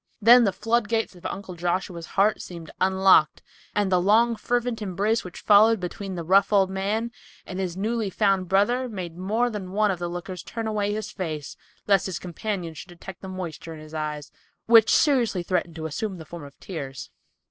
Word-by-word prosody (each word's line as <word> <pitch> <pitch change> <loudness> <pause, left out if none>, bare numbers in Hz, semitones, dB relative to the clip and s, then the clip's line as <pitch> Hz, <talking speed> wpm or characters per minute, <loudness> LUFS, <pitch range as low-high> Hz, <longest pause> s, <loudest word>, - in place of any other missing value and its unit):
Then 240 +2 +7
the 200 - +2
floodgates 225 +1 0
of 180 - -6
Uncle 195 -2 -6
Joshua's 175 0 -3
heart 205 +2 +3
seemed 170 -3 -9
unlocked, 190 -4 +4 0.3
and 205 -2 +1
the 180 -1 +3
long, 225 +5 +4
fervent 240 +1 -1
embrace 205 +3 0
which 180 - -9
followed 215 +1 +5
between 185 +2 -5
the 170 - -4
rough 195 +4 +4
old 195 -2 +3
man 210 +5 -1 0.3
and 185 - -6
his 185 -2 -3
newly 220 +1 -1
found 195 -2 +1
brother 240 +7 +2
made 180 -6 -6
more 220 +7 0
than 190 -4 -6
one 210 0 +2
of 180 - -4
the 175 0 -3
lookers 175 +1 -6
on - - -22
turn 230 -1 -4
away 210 -2 -1
his 215 0 -4
face 155 -6 -5 0.3
lest 195 -2 +3
his 185 -3 -3
companion 180 -1 -4
should 160 +4 -10
detect 180 +2 -11
the 190 - -8
moisture 170 -3 -6
in - - -11
his 155 0 -12
eyes, 150 -1 -4 0.3
which 225 -1 +6
seriously 240 - +3
threatened 175 -2 -1
to 160 -1 -6
assume 190 +5 -3
the 160 - -10
form 170 -3 -9
of 140 - -15
tears. 140 -8 -7
190 Hz, 195 wpm, -25 LUFS, 175-215 Hz, 0.3 s, Then